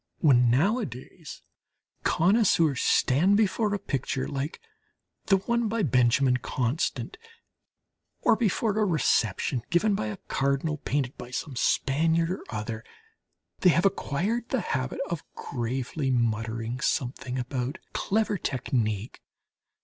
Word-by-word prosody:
...When, 125 -6 +4
nowadays, 145 - -2 0.6
connoisseurs 170 - +3
stand 175 +11 +3
before 215 0 +1
a 205 - +1
picture 135 -6 -2
like 140 +2 -4 0.7
the 195 - +5
one 235 +4 0
by 225 0 -1
Benjamin 125 -1 +3
Constant, 130 - -2 1.0
or - - +4
before 215 -1 0
a - - +3
reception 130 - +1
given 190 +5 +2
by 110 - -1
a 105 - -5
Cardinal, 140 +3 0
painted 140 -3 -2
by 125 - -8
some 130 +2 -5
Spaniard 160 +7 +1
or 185 - -4
other, 110 +1 -4 0.8
they 185 - +5
have 170 +2 +3
acquired 200 +5 0
the 260 - 0
habit 130 -7 -2
of 170 -3 -3
gravely 130 +3 -3
muttering 115 0 -1
something 125 -1 -2
about 125 +3 -3 0.2
"clever 210 -1 0
technique." 115 -6 -2
140 Hz, 120 wpm, -27 LUFS, 125-190 Hz, 1.0 s, the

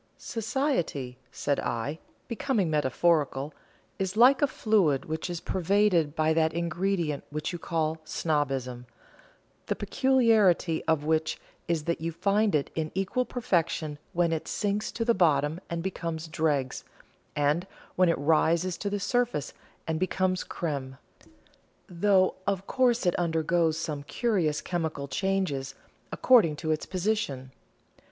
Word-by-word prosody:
"Society," 220 - -2
said 140 - -1
I, 120 +6 -3 0.3
becoming 225 - 0
metaphorical, 150 0 +1 0.5
"is 190 +1 -2
like 250 +3 +6
a 290 - +5
fluid 190 - +1
which 160 +1 -4
is 175 -1 -3
pervaded 180 -5 +1
by 155 0 +2
that 160 0 +2
ingredient 170 -2 -1
which 150 +4 -4
you 175 - -5
call 160 -1 -2
'snobbism,' 135 -6 -2 0.8
the - - 0
peculiarity 220 - +3
of 160 -2 +1
which 160 0 0 0.3
is 165 -3 0
that 170 0 -2
you 165 +1 -2
find 200 +3 +1
it 145 - 0
in 155 -1 -2
equal 195 +7 0
perfection 165 -10 -1
when 170 -2 +1
it 160 - -3
sinks 205 0 -1
to 230 - -3
the 235 - +4
bottom 155 -4 +2
and 170 0 -3
becomes 165 -3 -4
dregs, 150 -4 -1 0.5
and 150 +5 +1 0.3
when 185 -1 +4
it 165 - +2
rises 165 +4 +2
to 205 - -2
the 205 0 -2
surface 230 - -1 0.3
and 160 -1 -2
becomes 185 0 0
crême 140 -5 -4 0.9
though 185 +1 +3
of 195 -1 -1
course 245 -3 +2
it 175 - +3
undergoes 165 -1 +1
some 155 -3 -3
curious 170 -3 0
chemical 160 -5 -3
changes, 145 -7 -1 0.4
according 220 -12 +4
to 155 +1 -2
its 155 - -2
position. 180 -9 -2
165 Hz, 135 wpm, -28 LUFS, 150-195 Hz, 0.9 s, like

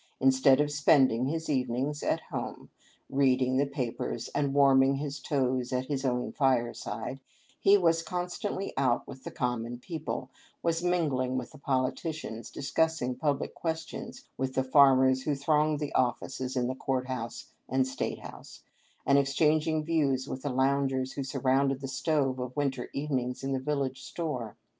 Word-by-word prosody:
Instead 130 0 +5
of 150 0 +2
spending 135 -4 +4
his 160 +2 -2
even 125 -4 0
ings 145 +4 -2
at - - 0
home, - - -5 0.4
reading 130 -1 +2
the 140 +1 +2
papers 120 -3 -3
and 140 -1 0
warming 135 -1 +5
his 140 0 -4
toes 130 -3 0
at 130 0 0
his 135 0 -2
own 125 -2 0
fireside, 120 -2 -1 0.4
he 200 +1 +6
was 165 -3 +3
constantly 180 +3 -3
out 130 -3 +1
with 130 -1 -10
the - - -5
common 120 -1 -2
people, 150 -2 -5 0.3
was 170 0 0
mingling 140 -8 +1
with - - -5
the 150 - -14
politi 130 +2 0
cians, 120 -8 -6
discussing 145 -3 0
public 145 -1 -1
questions 165 -1 -5
with 130 0 -2
the 130 - +2
farmers 130 -1 +5
who 145 +2 0
thronged 150 +2 +2
the 150 -2 -4
offices 130 +1 -1
in 125 -1 +1
the 130 - -1
court 130 -1 -2
house 120 -3 -5 0.2
and 130 +1 +2
state 130 - -3
house, - - -11 0.4
and 140 +1 +5
exchanging 155 +3 +2
views 145 -5 +1
with 130 - -5
the 145 - -2
loungers 130 0 +1
who 140 - -3
surrounded 135 +1 +1
the 135 - -5
stove 135 -1 0
of 125 +2 -5
winter 135 -3 -1
evenings 130 -3 -2
in 135 - -2
the 135 - 0
village 135 -1 -2
store. 130 -9 -4
135 Hz, 160 wpm, -29 LUFS, 130-150 Hz, 0.4 s, he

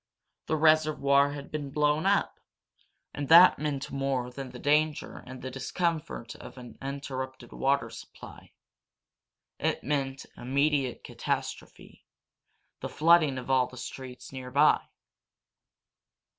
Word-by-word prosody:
The 160 - +1
reservoir 150 -3 +3
had 140 -1 -9
been 145 -2 -4
blown 150 +4 +1
up! 200 0 +1 0.7
And 145 -2 -5
that 170 +3 +8
meant 145 -3 -3
more 135 -3 -2
than 135 +1 -7
the 125 - -10
danger 150 +3 0
and 130 0 -9
the 130 - -5
discomfort 155 -1 -3
of - - -12
an 120 -3 -11
interrupted 130 -2 -6
water 140 +1 0
supply. - - -12 1.1
It - - -1
meant 135 -2 -2
an - - -13
immediate 140 0 0
catastrophe - - -5 0.8
the - - -5
flooding 155 -4 +4
of 130 +1 -4
all 130 -1 +3
the 125 - -13
streets 125 0 -8
nearby. 130 +3 +2
140 Hz, 120 wpm, -28 LUFS, 130-150 Hz, 1.1 s, that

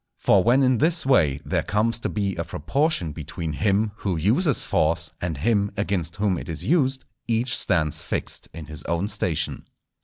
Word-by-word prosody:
For 95 -2 +3
when 125 +4 +4
in 130 -3 +3
this 165 0 +2
way 75 - +3
there - - 0
comes 110 +2 0
to - - -3
be 100 -2 -2
a 85 - -2
proportion 85 - 0
between 80 +1 -5
him 105 +5 +1
who 95 -7 -2
uses 120 - +2
force 80 +1 0
and 85 -4 -3
him 100 - +1
against 95 -5 -1
whom 100 -4 0
it - - -9
is 80 - -4
used, 135 -5 +1 0.2
each 120 +2 +1
stands 80 -6 +1
fixed - - -3
in 80 -2 -9
his 75 0 -5
own 85 +4 -1
station. 95 -7 -1
100 Hz, 180 wpm, -24 LUFS, 85-120 Hz, 0.2 s, when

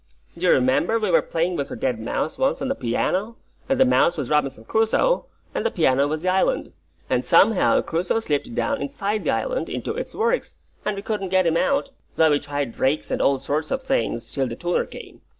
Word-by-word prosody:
Do 175 +2 -1
you - - +6
remember 130 - +3
we 215 -4 0
were - - +5
playing 170 +2 -1
with 140 -1 -3
a - - -5
dead 125 -4 -1
mouse 120 +7 -3
once 270 - +1
on 270 - -2
the - - +2
piano, 190 - -1 0.3
and 270 -1 +1
the 265 - +6
mouse 175 -8 +3
was - - -3
Robinson 135 -6 0
Crusoe, 225 - +1 0.3
and - - -2
the - - +2
piano 140 -4 +2
was 155 +2 -3
the 185 - +1
island, 190 - +1 0.3
and - - 0
somehow 220 -4 +4
Crusoe 175 +6 -1
slipped 225 - -2
down 280 - -1
inside 215 -6 -2
the - - +1
island, - - -1
into - - -3
its - - -6
works, 470 +3 0 0.3
and 210 - 0
we 200 - -6
couldn't 210 -4 -3
get 185 0 +3
him 165 -1 +2
out, 275 +6 +1 0.2
though 160 -1 +4
we 145 - +3
tried 145 -4 -4
rakes 135 +4 0
and - - 0
all 140 - +3
sorts 145 +3 -2
of 265 0 -2
things, 265 - -1
till 135 -1 0
the 115 - -5
tuner 175 +6 -1
came. - - -11
180 Hz, 220 wpm, -23 LUFS, 145-235 Hz, 0.3 s, you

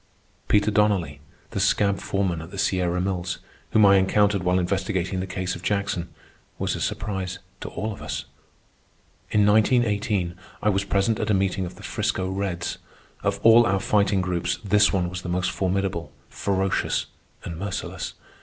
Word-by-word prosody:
Peter 105 +1 +3
Donnelly, 100 -8 +1 0.3
the - - -2
scab 100 -1 +2
foreman 95 -4 -1
at 80 - -9
the 100 - -9
Sierra 90 -2 +1
Mills 90 -1 -2 0.3
whom 110 -1 +5
I 100 0 +7
encountered 100 +1 +3
while 90 0 +2
investigating 95 0 -1
the 95 - -3
case 90 -1 -3
of - - -9
Jackson, 100 -3 -1 0.5
was - - -1
a - - -5
surprise 95 -2 -2 0.2
to - - -6
all 110 +1 -3
of - - -12
us. 70 +2 -4 1.0
In 105 -1 +3
1918 105 -4 +2 0.3
I 105 - +4
was 100 -1 +1
present 100 +2 +1
at 105 - -1
a 105 - +4
meeting 95 -1 0
of - - -10
the - - -13
'Frisco 95 - -1
Reds. 95 -3 -3 0.4
Of - - 0
all 115 +1 +7
our 100 -3 +2
Fighting 100 -1 +2
Groups 90 -2 -1
this 105 0 +4
one 90 -3 +1
was 90 +1 -5
the 90 - -6
most 90 +1 0
formidable, 95 -2 -1 0.2
ferocious, 95 -1 0 0.4
and 85 -1 -6
merciless. 100 -1 -4
95 Hz, 165 wpm, -25 LUFS, 90-100 Hz, 1.0 s, I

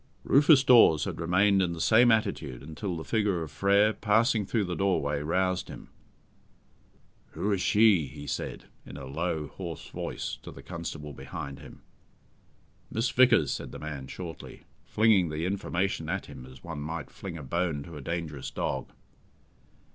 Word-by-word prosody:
Rufus 145 0 +6
Dawes 115 - +6
had - - -4
remained 95 +4 +3
in 90 -2 0
the 85 - -7
same 120 +6 +5
attitude 70 - -1
until 85 +4 -5
the 80 - -6
figure 105 -6 0
of 75 - -8
Frere, 100 +7 +3
passing 110 0 +2
through 110 -1 +1
the 90 -2 -3
doorway, 75 -7 0
roused 90 +4 0
him. - - -10 1.4
"Who 105 - -1
is 100 -2 0
she?" 105 -9 +4
he 75 +2 -10
said, - - -4 0.2
in 70 - -10
a 70 - -8
low, 80 +3 -2
hoarse 85 -4 -7
voice, - - -5
to - - -9
the 70 - -12
constable 80 -2 -6
behind 70 +1 -7
him. 75 - -13 1.1
"Miss 115 +3 -1
Vickers," 120 - +5
said - - -5
the - - -8
man 75 -3 -6
shortly, 85 +1 -9 0.2
flinging 105 -6 +3
the 75 +2 -3
information 95 0 -2
at - - -2
him 65 - -11
as 65 0 -15
one 85 -3 -6
might 80 +2 -5
fling 90 -4 -7
a 75 - -8
bone 80 +1 -1
to 85 +2 -11
a 75 - -7
dangerous 75 -4 -4
dog. 70 - -3
85 Hz, 165 wpm, -28 LUFS, 75-100 Hz, 1.4 s, Rufus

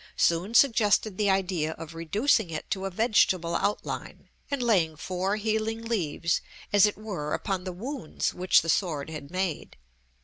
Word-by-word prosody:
soon 175 +7 +1
suggested 220 -5 +4
the 205 0 +1
idea 180 -5 0
of 165 0 -9
reducing 200 - +1
it 155 -1 -5
to 195 -1 -1
a - - -1
vegetable 185 -5 +2
outline, 205 +4 -3 0.2
and 280 -3 -1
laying 180 -9 +2
four 185 +5 -2
healing 220 +1 -1
leaves, 170 -7 0 0.3
as 205 0 +7
it 210 - -3
were, 185 -9 -3
upon 190 -3 -3
the 185 - -3
wounds 230 - -3
which 180 0 +3
the - - -6
sword 160 -3 0
had 145 -3 -7
made. 185 -3 -3
190 Hz, 160 wpm, -27 LUFS, 165-215 Hz, 0.3 s, as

